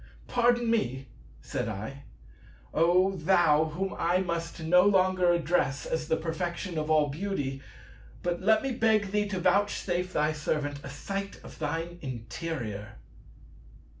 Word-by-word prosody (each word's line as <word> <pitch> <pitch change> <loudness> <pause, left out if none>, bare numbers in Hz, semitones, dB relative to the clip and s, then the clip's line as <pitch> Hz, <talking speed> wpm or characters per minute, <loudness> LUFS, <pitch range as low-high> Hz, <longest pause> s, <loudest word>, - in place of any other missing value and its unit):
"Pardon 240 0 +2
me," 130 - -1 0.3
said 110 - -3
I, 110 +7 -6 0.7
"O 180 +4 +4
Thou 160 -3 +4
Whom 185 +5 -3
I 175 +2 +2
must 170 -3 -3
no 180 +3 +6
longer 185 -2 +4
address 160 -6 +1
as 160 -1 -2
the 160 - +2
Perfection 170 +1 -3
of 155 0 -3
all 155 -2 +4
Beauty; 145 -5 -3 0.6
but 175 0 -1
let 220 +4 +4
me 270 - -1
beg 220 -4 +2
thee 210 0 +1
to 195 -2 -3
vouchsafe 180 -1 +1
thy 150 -1 +1
servant 150 -1 -2
a - - -7
sight 195 +8 -5
of - - -12
thine 165 +3 -3
interior." 115 -4 -5
170 Hz, 135 wpm, -29 LUFS, 150-190 Hz, 0.7 s, no